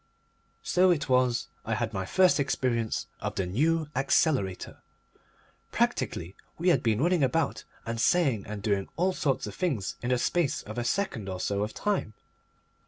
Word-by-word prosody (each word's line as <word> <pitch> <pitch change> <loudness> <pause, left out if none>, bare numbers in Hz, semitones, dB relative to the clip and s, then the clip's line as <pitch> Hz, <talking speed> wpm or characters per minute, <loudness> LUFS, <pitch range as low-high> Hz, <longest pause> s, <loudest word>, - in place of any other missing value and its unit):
So 185 +1 +3
it 150 -5 +1
was 125 -2 +2
I - - -1
had - - -2
my 95 -1 -3
first 185 - +4
experience 120 -5 0
of - - -4
the 95 - -1
New 155 - +1
Accelerator. 135 - +1 0.9
Practically 85 +4 -1 0.2
we 175 +3 +2
had 175 - +4
been 115 -1 +1
running 175 +1 +2
about 150 +2 0 0.2
and 115 0 -2
saying 135 - +2
and 105 -1 -6
doing 100 -3 0
all 185 +4 +1
sorts 135 -7 0
of - - -6
things 135 - -2
in 120 - -3
the 125 - +3
space 160 +3 0
of 110 +3 -6
a - - -1
second 120 - -1
or 95 -1 -4
so 100 +1 -1
of 105 +1 -3
time. 200 - -1
125 Hz, 170 wpm, -28 LUFS, 105-165 Hz, 0.9 s, first